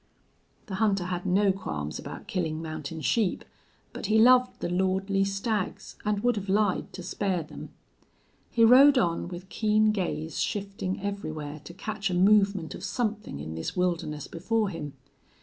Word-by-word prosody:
The 195 - -8
hunter 200 -4 +2
had 180 +1 -3
no 195 +2 +4
qualms 75 - -4
about - - -8
killing 160 -4 -2
mountain 155 -1 -6
sheep, 210 +2 +1 0.5
but - - -5
he 215 - +3
loved 250 +2 +5
the - - -2
lordly 190 +2 +1
stags 195 +1 -2
and 210 0 -1
would 245 -2 +2
have 200 -1 -4
lied 200 -1 +1
to 180 - -7
spare 185 -2 -1
them. 155 - -10 0.8
He 230 -1 +4
rode 270 +4 +8
on, 170 -8 +1
with 175 +1 -8
keen 215 0 +3
gaze 175 -5 -2
shifting 200 -1 -3
everywhere 155 -7 -4
to 170 - -9
catch 210 0 -3
a 180 - -1
movement 195 -2 +3
of - - -9
something 215 - -2
in 80 +2 -6
this 80 - -5
wilderness 165 -5 -1
before 210 +5 -1
him. 150 -5 -6
195 Hz, 160 wpm, -27 LUFS, 170-210 Hz, 0.8 s, rode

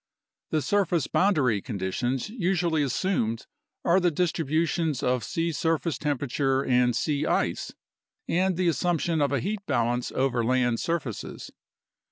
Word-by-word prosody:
The 155 -2 0
surface 180 -6 +1
boundary 140 - +2
conditions 120 +4 -2
usually 175 -7 0
assumed 130 - -1 0.4
are 175 +2 +5
the 180 -1 +3
distributions 160 -2 0
of 125 -2 +1
sea 165 +9 -1
surface 165 0 -1
temperature 135 -2 0
and 125 -1 +3
sea 145 +3 0
ice, - - 0 0.5
and 185 0 +1
the 180 -1 +1
assumption 170 0 +1
of 140 -1 +2
a 140 - +1
heat 200 - -3
balance 120 +1 0
over 130 -3 +1
land 120 -1 +1
surfaces. 155 -10 -4
145 Hz, 130 wpm, -26 LUFS, 125-170 Hz, 0.5 s, are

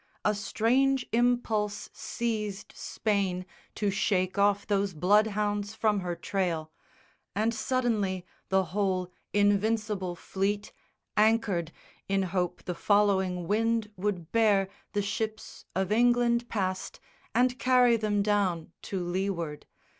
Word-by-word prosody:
A 210 - +4
strange 255 +6 +1
impulse 230 -3 +1
seized 215 -4 -3
Spain 195 -4 -1 0.3
to 205 -2 0
shake 190 -1 +1
off 200 0 +3
those 200 -3 0
bloodhounds 205 +3 +2
from 215 -2 +2
her 175 -2 -3
trail, 170 -2 -2 0.6
And 220 +3 +1
suddenly 220 -7 0 0.2
the 190 0 +3
whole 185 -3 0 0.2
Invincible 205 -2 +1
Fleet 200 +4 -2 0.4
Anchored, 210 -6 +2 0.4
in 195 0 +2
hope 180 -1 -2
the 180 - -3
following 190 -2 +2
wind 225 +1 +1
would 180 -4 -3
bear 205 -4 +3 0.2
The 205 -1 0
ships 220 +1 -4
of 190 +1 0
England 240 +1 +3
past 185 -3 -2 0.4
and 250 +1 +3
carry 250 -2 +5
them 210 -2 +1
down 195 -6 0
To 195 - -4
leeward. 175 -4 -3
205 Hz, 115 wpm, -29 LUFS, 190-220 Hz, 0.6 s, carry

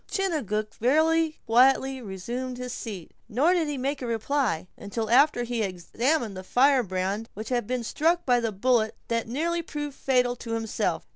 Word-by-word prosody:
Chingachgook 230 - -1
very 315 +5 +2
quietly 265 +3 +4
resumed 240 +5 -5
his 250 -1 -5
seat; 200 -8 -7 0.2
nor 280 +10 +3
did 340 -4 +1
he 295 -1 -3
make 275 +2 -2
any 245 - -3
reply, 230 - 0
until 220 +2 -4
after 265 0 +5
he 240 0 -3
had 210 -3 +1
examined 225 - -1
the 185 - -7
firebrand 220 -4 +1
which 215 +2 -6
had 240 -4 -1
been 250 -1 -2
struck 335 +8 +1
by 245 -2 +4
the 230 -2 -1
bullet 220 +2 +1
that 230 -1 0
had - - -11
nearly 335 +7 -1
proved 295 -3 -5
fatal 250 -2 +1
to 230 -1 -6
himself. 225 -1 -1
245 Hz, 175 wpm, -26 LUFS, 220-280 Hz, 0.2 s, after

